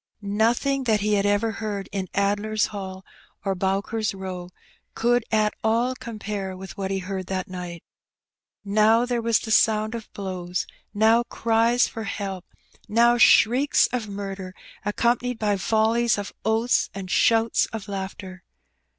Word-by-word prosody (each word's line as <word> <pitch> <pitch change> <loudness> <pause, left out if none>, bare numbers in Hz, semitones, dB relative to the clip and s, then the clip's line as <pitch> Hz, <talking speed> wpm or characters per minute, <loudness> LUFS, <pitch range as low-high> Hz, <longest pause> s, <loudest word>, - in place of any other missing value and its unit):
' - - -51 0.2
Nothing 265 +4 +1
that 215 -3 +2
he 210 +1 +1
had 200 0 +2
ever 205 +2 +1
heard 205 -2 -4
in 190 -2 -3
Addler's 205 +2 +1
Hall 190 -1 -7 0.4
or 195 - +1
Bowker's 195 +3 -1
Row 185 -2 -6 0.5
could 240 +1 +2
at 215 -1 +2
all 230 +3 +2
compare 210 -6 -5
with 190 0 -9
what 195 -1 -3
he 195 - -1
heard 190 0 -5
that 185 -1 -3
night: 180 -2 -7 0.8
now 215 +3 +4
there 245 -1 -1
was 230 -1 +3
the 220 - -5
sound 215 0 +3
of 230 -2 -7
blows; 185 -2 -4 0.3
now 220 +3 +4
cries 230 +2 +2
for 225 -1 -6
help; 195 -3 -4 0.4
now 235 +2 +4
shrieks 250 +6 +5
of 230 -4 -2
murder, 195 -2 -6 0.3
accompanied 240 +3 0
by 210 -2 +1
volleys 220 +2 +2
of 205 -1 -5
oaths 225 +2 +2
and 190 -2 -6
shouts 225 0 +3
of 220 -2 -7
laughter. 190 -1 -6
210 Hz, 150 wpm, -24 LUFS, 195-225 Hz, 0.8 s, shrieks